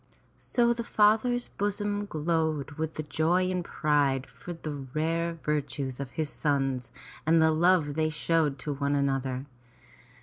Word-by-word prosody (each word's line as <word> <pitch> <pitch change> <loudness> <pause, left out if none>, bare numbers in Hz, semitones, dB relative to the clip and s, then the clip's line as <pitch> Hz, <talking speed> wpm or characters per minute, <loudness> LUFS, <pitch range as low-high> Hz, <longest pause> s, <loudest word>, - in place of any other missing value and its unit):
So 235 -1 +2
the 235 0 -4
father's 225 +3 +3
bosom 205 0 -1
glowed 160 -3 -1
with 155 0 -4
joy 175 +6 +2
and 180 -1 -1
pride 145 -5 +1
for 175 - -10
the 165 -3 -5 0.2
rare 165 +2 0
virtues 140 -3 -2
of 140 -3 -4
his 155 +2 -2
sons 135 -4 -1 0.3
and 165 +2 +4
the 160 0 +5
love 160 -2 +3
they 155 +1 +1
showed 155 -2 +1
to 150 - -1
one 140 +1 0
another. 135 -2 0
155 Hz, 140 wpm, -28 LUFS, 140-175 Hz, 0.3 s, the